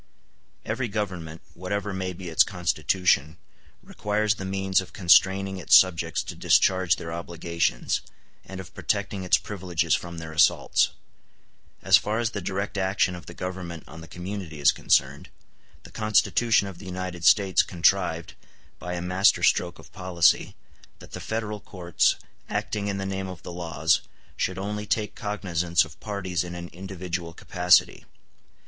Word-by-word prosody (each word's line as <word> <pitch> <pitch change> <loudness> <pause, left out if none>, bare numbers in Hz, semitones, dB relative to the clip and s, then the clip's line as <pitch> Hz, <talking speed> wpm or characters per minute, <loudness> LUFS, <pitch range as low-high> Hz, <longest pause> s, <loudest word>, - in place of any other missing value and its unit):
Every 120 +3 -2
government, 90 -6 -4
whatever 100 +3 -3
may 95 -1 -3
be 90 0 -8
its 80 - +3
constitution, 85 -3 +1 0.5
requires 105 0 0
the 95 -2 -7
means 95 -1 +1
of 90 -2 -12
constraining 95 +2 +4
its 90 - +4
subjects 85 -3 +4
to - - -7
discharge 95 -1 +3
their 80 0 -7
obligations, 85 -5 -2 0.4
and 95 0 -9
of 90 -3 -10
protecting 100 -2 -2
its 90 - +4
privileges 90 -5 -2
from 85 -1 -2
their 80 -1 -7
assaults. 80 -1 +3 0.9
As - - +7
far 105 +1 -2
as 115 -1 0
the 100 - -4
direct 100 +2 -3
action 95 -1 +1
of 90 - -10
the 85 - -10
Government 90 -3 -6
on 80 +1 -11
the 85 - -11
community 90 -1 -7
is 70 - +6
concerned, 65 +2 +1 0.5
the - - -14
Constitution 110 0 +2
of 95 -3 -9
the - - -11
United 90 -2 -5
States 95 +1 +5
contrived, 85 -1 +1 0.5
by 90 0 -5
a 85 - -4
master 90 +2 +3
stroke 85 -1 +2
of - - -16
policy, 90 -3 +2 0.4
that - - -15
the - - -6
federal 110 -1 -4
courts, 90 -5 0 0.3
acting 105 -1 -2
in 100 -1 -2
the 95 - -3
name 95 0 -3
of 90 -2 -9
the 90 - -7
laws, 80 -2 +1 0.3
should 95 - -2
only 105 +2 -4
take 110 -2 -1
cognizance 90 -6 0
of 80 0 -15
parties 95 -5 -3
in 85 0 -7
an 85 0 -7
individual 90 -2 -6
capacity. 90 +1 +2
90 Hz, 155 wpm, -25 LUFS, 85-100 Hz, 0.9 s, As